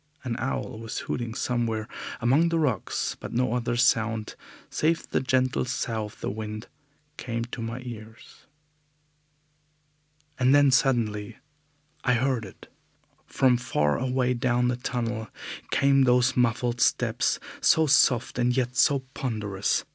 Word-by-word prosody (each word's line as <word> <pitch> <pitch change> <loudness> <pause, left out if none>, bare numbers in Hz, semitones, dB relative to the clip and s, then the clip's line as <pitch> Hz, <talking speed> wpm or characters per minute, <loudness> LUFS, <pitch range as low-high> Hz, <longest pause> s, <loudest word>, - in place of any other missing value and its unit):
An 120 -3 -3
owl 120 -3 -3
was 115 -1 -6
hooting 115 -2 -4
somewhere 115 -4 -1 0.3
among 140 +8 +3
the 165 - 0
rocks, 125 - -1
but - - -7
no 120 -1 +1
other 120 -1 -1
sound, 115 -3 +1 0.4
save 165 +2 0
the - - 0
gentle 130 -1 +1
sough 115 -3 -2
of 105 - -12
the - - -2
wind, 110 +1 -6 0.5
came 115 -1 -3
to 120 0 -7
my 115 +2 -4
ears. 115 -2 -11 1.9
And 130 +2 +5
then 145 -1 +5
suddenly 115 -6 +1 0.7
I 125 - +3
heard 125 -2 0
it! 95 - -13 0.6
From 130 -2 +3
far 75 -12 0
away 125 0 +1
down 125 0 +1
the 125 - 0
tunnel 115 -2 -3 0.4
came 135 -1 +4
those 125 0 +3
muffled 120 0 +1
steps, - - +2 0.2
so 160 - +5
soft 125 -4 +3
and 125 +1 +2
yet 125 -1 0
so 140 +2 +4
ponderous. 105 -6 -1
120 Hz, 135 wpm, -26 LUFS, 115-130 Hz, 1.9 s, And